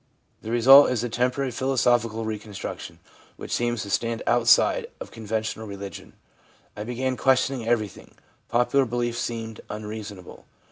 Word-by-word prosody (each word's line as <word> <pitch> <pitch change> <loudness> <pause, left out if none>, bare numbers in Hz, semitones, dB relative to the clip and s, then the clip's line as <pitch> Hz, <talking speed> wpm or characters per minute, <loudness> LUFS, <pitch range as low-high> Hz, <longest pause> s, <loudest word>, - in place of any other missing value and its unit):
The 110 - -7
result 130 +5 +8
is 125 -2 -1
a 120 - -2
temporary 125 +3 0
philosophical 120 -3 +1
reconstruction, 105 -2 -6 0.4
which - - -9
seems 120 -1 0
to 100 - -7
stand 115 +2 -1
outside - - +4
of - - -8
conventional 110 0 -4
religion. 100 -2 -8 0.3
' - - -33
I 105 - -5
began 130 +3 -2
questioning 130 -2 +1
everything. 110 -4 -2 0.3
Popular 125 +3 +2
beliefs 120 0 -2
seemed 115 -2 -5
unreasonable. 105 -3 -8
115 Hz, 135 wpm, -25 LUFS, 110-125 Hz, 0.4 s, result